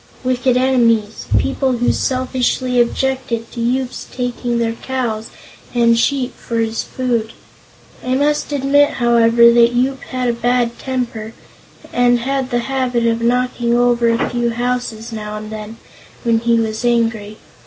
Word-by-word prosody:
"Wicked 255 0 +1
enemies. 230 -5 +1
People 270 -1 0
who 245 0 +1
selfishly 255 -1 0
objected 245 -2 -2
to 235 - -5
Yoop's 250 +2 -2
taking 245 -1 -2
their 230 -1 0
cows 230 -3 -3 0.5
and 235 -1 +4
sheep 255 +2 0
for 230 - -5
his 225 0 0
food. 235 -4 -2 0.7
I 255 +1 0
must 295 +2 0
admit, 285 +1 +3
however, 235 -1 +5
that 235 0 +5
Yoop 265 +2 0
had 255 -1 -3
a 240 - +1
bad 240 0 0
temper, 245 -4 -4 0.6
and 245 0 +3
had 265 +2 -2
the 240 -2 0
habit 255 -2 -1
of 230 0 +1
knocking 240 0 +1
over 240 -1 +3
a 230 +1 +1
few 240 -1 0
houses, 240 -1 -3
now 215 -1 -5
and 215 0 -8
then, 215 +1 -7 0.5
when 230 -2 +2
he 235 0 +2
was 220 0 -2
angry. 225 -3 0
240 Hz, 145 wpm, -18 LUFS, 230-255 Hz, 0.7 s, however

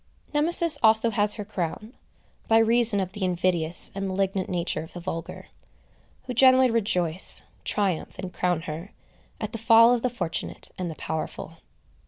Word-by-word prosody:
Nemesis 330 +2 +3
also 220 +1 +4
has 210 0 +2
her 210 - -7
crown, 205 +3 -5 0.5
by 225 - +4
reason 225 -1 +3
of 185 -1 -3
the 205 - -6
invidious 175 -2 0
and 195 0 -4
malignant 190 0 -2
nature 175 -2 -2
of 160 - -11
the 175 - -8
vulgar, 165 -1 -7 0.7
who 250 - -6
generally 260 0 +5
rejoice, 185 -6 +3 0.2
triumph, 195 -5 -2
and 185 -1 -7
crown 180 -3 -1
her, 165 +5 -8 0.5
at - - -5
the 230 - -6
fall 230 +2 +6
of 245 - -1
the 255 - 0
fortunate 230 -9 -5
and 180 -2 -5
the 160 - -7
powerful. 160 +1 -6
195 Hz, 160 wpm, -25 LUFS, 175-230 Hz, 0.7 s, fall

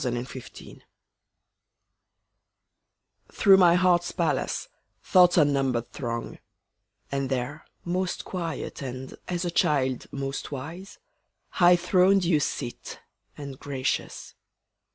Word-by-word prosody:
Day 130 - -1
and 120 +2 -4
Night 130 - -11 2.5
Through 195 -1 +6
my 175 -2 +6
heart's 175 -1 +3
palace - - -1 0.4
Thoughts 180 -2 +5
unnumbered 135 -6 +2
throng; 115 -2 -5 0.7
And 135 -1 -2
there, 135 +4 -3 0.2
most 180 +1 -2
quiet 170 -5 -5
and, 130 0 -6
as 180 0 -2
a 175 - -1
child, 130 -6 +1
most 135 +1 -5
wise, 160 +8 -7 0.5
High 175 0 +5
throned 180 +2 +3
you 165 -3 +3
sit, 120 -4 -4 0.4
and 140 -2 -8
gracious. 135 -2 -3
150 Hz, 105 wpm, -26 LUFS, 130-180 Hz, 2.5 s, Through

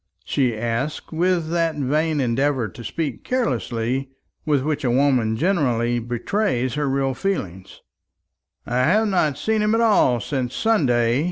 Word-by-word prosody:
she 125 -5 0
asked, 120 +6 -3
with 170 -1 0
that 165 -2 +1
vain 150 +2 0
endeavour 130 0 +1
to 120 - -11
speak 150 -1 -4
carelessly 130 - -1 0.4
with 145 -3 +2
which 150 -1 -2
a 125 - +1
woman 125 -4 +2
generally 120 - +1
betrays 125 - -1
her 145 -1 -1
real 135 0 0
feeling. 100 - -3 1.0
"I 125 - -2
have 185 +13 +3
not 155 -7 +1
seen 220 +7 0
him 210 +1 +2
at 230 - +2
all 205 - +4
since 125 +1 -3
Sunday. 125 - +2
135 Hz, 145 wpm, -22 LUFS, 120-165 Hz, 1.0 s, all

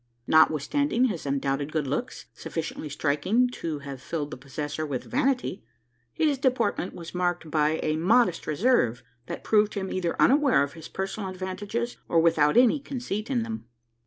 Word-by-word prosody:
Notwithstanding 230 - +3
his 185 - -2
undoubted 140 +1 -1
good 155 -2 -1
looks 140 +3 -3
sufficiently 160 +3 -5
striking 155 - +1
to 165 -10 -4
have 135 -2 -7
filled 150 -1 -4
the - - -4
possessor 145 +4 -5
with 140 -5 -3
vanity 260 -6 -1 0.5
his 295 -4 +1
deportment 245 -8 0
was 170 -1 -9
marked 175 -3 -1
by 155 +1 +2
a 155 0 0
modest 185 +1 +3
reserve, 155 - +2 0.2
that - - -6
proved 210 -1 +3
him 190 -2 -3
either 175 -2 -2
unaware 275 - +5
of 140 - -5
his 165 -2 -10
personal 195 +1 -4
advantages, 190 +6 -4
or 165 - +4
without 160 -1 +3
any 250 +4 +5
conceit 245 -6 -4
in 245 -4 +1
them. 225 - -6
180 Hz, 160 wpm, -26 LUFS, 150-235 Hz, 0.5 s, unaware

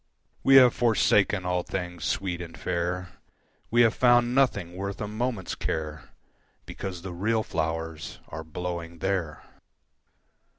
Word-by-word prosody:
We 135 - +5
have 125 -3 +8
forsaken 105 -5 +3
all 90 0 +1
things 90 -4 -5
sweet 90 +3 -1
and 85 -1 -8
fair, 90 +1 -2 0.6
We 120 +1 +4
have 115 -1 +4
found 120 -1 +4
nothing 105 -10 +1
worth 100 +1 -4
a 105 - -3
moment's 110 -3 -3
care 75 -2 -4 0.6
Because 90 -3 -6
the 95 -2 -6
real 110 +5 0
flowers 80 -2 -3
are 80 - -6
blowing 85 +1 -5
there. 85 -5 -2
90 Hz, 130 wpm, -27 LUFS, 85-110 Hz, 0.6 s, have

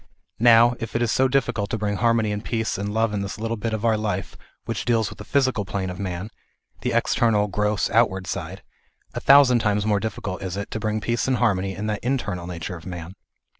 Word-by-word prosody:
Now, 120 +1 +6
if 115 0 -6
it 120 - +1
is 115 - +1
difficult 125 -6 +1
to 110 - -1
bring 105 -1 -1
harmony 115 -1 +2
and 105 +1 -3
peace 115 -2 -1
and 100 +1 -3
love 110 0 +1
in 100 - -1
this 100 -2 -5
little 115 +1 -2
bit 115 +1 -3
of 110 +1 -2
our 110 -1 +3
life 105 -4 -3 0.3
which - - -3
deals 115 -4 +1
with - - -12
the - - -7
physical 130 -6 +1
plane 95 0 -3
of 90 - -8
man, 95 +2 -4 0.5
the - - -1
external, 105 -3 +2
gross, 105 0 0
out 115 +2 +5
ward 95 -1 -6
side, 85 - -5 0.5
a - - -3
thousand 135 -3 +6
times 105 -2 +1
more 105 -2 +2
difficult 100 -3 -4
is 95 0 -4
it, 100 - -5
to 110 - -3
bring 110 0 -1
peace 120 +3 -1
and 130 -1 +2
harmony 95 -5 +1
in 105 - -4
that 105 -1 -3
internal 105 -9 -2
nature 90 +1 -5
of 85 +1 -11
man. 85 -1 -7
105 Hz, 225 wpm, -23 LUFS, 100-115 Hz, 0.5 s, Now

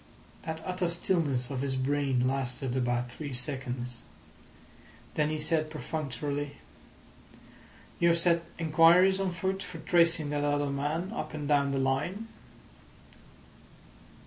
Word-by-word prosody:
That 160 0 -5
utter 180 -1 0
stillness 155 -7 0
of 130 -2 -2
his 135 -1 -1
brain 135 -1 +1
lasted 130 -1 -2
about 120 -1 0
three 145 +1 -6
seconds. 125 -2 -4 1.1
Then 150 0 +1
he 155 - -1
said 155 0 +2
perfunctorily: 145 -2 -4 1.4
"You 170 - +4
have 170 - +4
set 170 0 +3 0.2
inquiries 170 +4 +5
on 195 -1 0
foot 190 +3 -2
for 180 - -7
tracing 165 -2 +2
that 145 0 0
other 145 -1 +1
man 150 +7 -2
up 155 -7 -5
and 150 -2 -4
down 140 -1 +3
the 135 - 0
line?" 155 +12 -1
150 Hz, 125 wpm, -29 LUFS, 135-170 Hz, 1.4 s, inquiries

